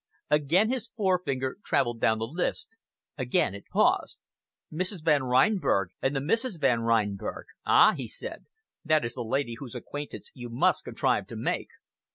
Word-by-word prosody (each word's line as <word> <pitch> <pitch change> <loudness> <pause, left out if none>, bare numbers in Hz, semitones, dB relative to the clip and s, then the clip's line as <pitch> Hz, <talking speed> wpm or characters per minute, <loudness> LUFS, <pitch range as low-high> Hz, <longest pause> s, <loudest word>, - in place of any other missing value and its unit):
Again 160 - +3
his 255 -3 -1
forefinger 180 - -1
travelled 120 -2 +1
down 110 - +3
the 110 - -2
list 175 - -3 0.4
again 125 -6 +1
it 100 - -10
paused. - - +2 0.5
"Mrs. 185 +1 -2
Van 150 -3 +4
Reinberg, 130 - +2
and 135 +2 0
the - - +1
Misses 225 - 0
Van 130 -6 +2
Reinberg! 110 -4 -1 0.2
Ah!" - - +7
he - - -5
said, - - -7 0.4
"that 155 -3 +2
is 120 - -3
the 125 - -5
lady 120 0 -1
whose 130 -3 -8
acquaintance 145 +4 -7
you 120 -2 -8
must 115 - +1
contrive - - 0
to - - -8
make." - - -2
135 Hz, 160 wpm, -28 LUFS, 120-175 Hz, 0.5 s, Ah